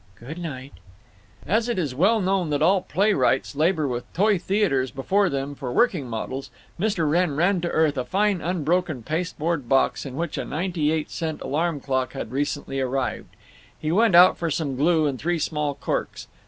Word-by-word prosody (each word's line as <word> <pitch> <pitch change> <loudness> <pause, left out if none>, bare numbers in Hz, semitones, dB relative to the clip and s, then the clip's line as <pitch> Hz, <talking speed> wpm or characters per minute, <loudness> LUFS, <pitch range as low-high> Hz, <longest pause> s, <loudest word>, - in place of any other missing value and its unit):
"Good 150 +9 -8
night." 140 -5 -7 0.7
As 220 +8 +1
it 235 - -1
is 150 -8 -1
well 195 - +3
known 190 -3 0
that 145 -1 0
all 190 0 +4
playwrights 195 -10 +1
labor 155 0 +2
with 120 -2 -5
toy 205 +1 +2
theaters 180 -9 +1
before 190 +10 +1
them 140 +1 -3
for 135 -3 -6
working 180 - +2
models, 130 +4 -5 0.3
Mr. 190 -5 0
Wrenn 165 -1 +1
ran 175 +4 +2
to 170 - -1
earth 155 -5 +1
a - - -1
fine 200 +3 +1
unbroken 170 -4 -1
pasteboard 160 -2 -2
box 135 0 +2
in 135 -2 -7
which 170 +2 -3
a - - -2
ninety 165 -2 -1
eight 160 -1 -2
cent 160 -2 -3
alarm 160 +1 -1
clock 130 -1 -1
had 135 - -6
recently 140 0 -2
arrived. 130 0 -3 0.4
He 155 - -2
went 215 +1 +4
out 180 +1 +7
for 170 - -1
some 145 -3 -2
glue 155 +3 +2
and 135 -4 -1
three 175 +1 0
small 150 -2 -2
corks. - - -3
160 Hz, 180 wpm, -24 LUFS, 140-180 Hz, 0.7 s, out